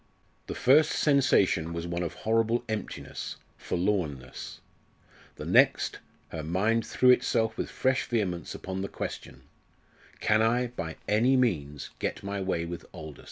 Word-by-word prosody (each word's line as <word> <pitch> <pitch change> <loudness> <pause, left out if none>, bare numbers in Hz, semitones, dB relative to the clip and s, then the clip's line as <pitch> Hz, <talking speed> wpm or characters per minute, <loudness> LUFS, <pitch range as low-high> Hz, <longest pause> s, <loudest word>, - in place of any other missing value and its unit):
The - - -4
first 150 +4 +5
sensation 100 - +3
was 85 0 -4
one 85 0 -3
of 85 - -3
horrible 115 +2 +1
emptiness, 110 -2 -5 0.2
forlornness. 85 -9 -3 0.8
The - - -7
next - - +3 0.3
her 80 - -5
mind 105 +8 +1
threw 125 0 +5
itself 115 -3 +2
with - - -3
fresh 130 0 0
vehemence 95 -7 -2
upon 95 0 -5
the 100 - -2
question, - - -6 0.8
"Can 110 +1 +3
I, 120 +2 +2
by 80 -9 -5
any 120 +6 +4
means, 75 - -1
get - - -3
my 100 0 -3
way 90 -3 -1
with 85 0 -6
Aldous?" 80 -5 -9
100 Hz, 140 wpm, -28 LUFS, 85-120 Hz, 0.8 s, first